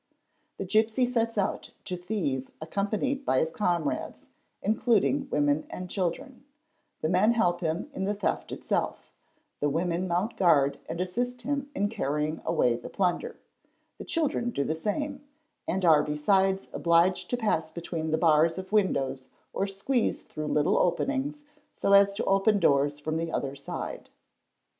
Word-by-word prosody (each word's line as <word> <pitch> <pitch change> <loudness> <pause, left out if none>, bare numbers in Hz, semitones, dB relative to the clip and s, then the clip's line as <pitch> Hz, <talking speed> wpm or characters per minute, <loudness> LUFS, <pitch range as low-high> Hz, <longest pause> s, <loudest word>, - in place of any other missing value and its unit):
The 195 - -4
gipsy 220 +5 +2
sets 230 -2 -1
out 195 - -1
to 180 - -3
thieve 175 -8 -2
accompanied 205 - -1
by 130 - +1
his 160 +4 +1
comrades, 170 -5 -1 0.4
including 235 +6 +2
women 145 - +1
and 180 -1 -7
children; 245 - -3 0.6
the - - +1
men 195 +6 +4
help 175 -6 +1
him 165 - -1
in 190 - -2
the 205 +1 0
theft 200 - -2
itself; - - -2 0.5
the 145 - +1
women 170 +4 -1
mount 180 +6 -1
guard 145 -6 +4
and 165 - -4
assist 245 +7 -2
him 280 +1 -2
in 205 - +1
carrying 155 -7 -2
away 120 -1 +2
the 120 - -9
plunder; 200 - -1 0.6
the - - -5
children 300 -7 0
do 140 -12 -1
the 155 - -1
same, 275 - -3 0.4
and 185 +1 0
are 155 -3 +6
besides 190 +6 +1
obliged 170 +2 +2
to 245 - 0
pass 210 -9 0
between 165 -1 -4
the 155 - +1
bars 160 0 +4
of 185 +1 -7
windows 135 -11 +1 0.3
or 195 - 0
squeeze 210 +6 -1
through 155 0 -6
little 150 0 +2
openings 275 - 0 0.3
so 200 - +2
as 200 0 +6
to - - -2
open 195 +2 +3
doors 145 -3 +2
from 155 +2 -2
the 165 0 -2
other 140 0 -2
side. 140 - -6
185 Hz, 155 wpm, -28 LUFS, 160-220 Hz, 0.6 s, are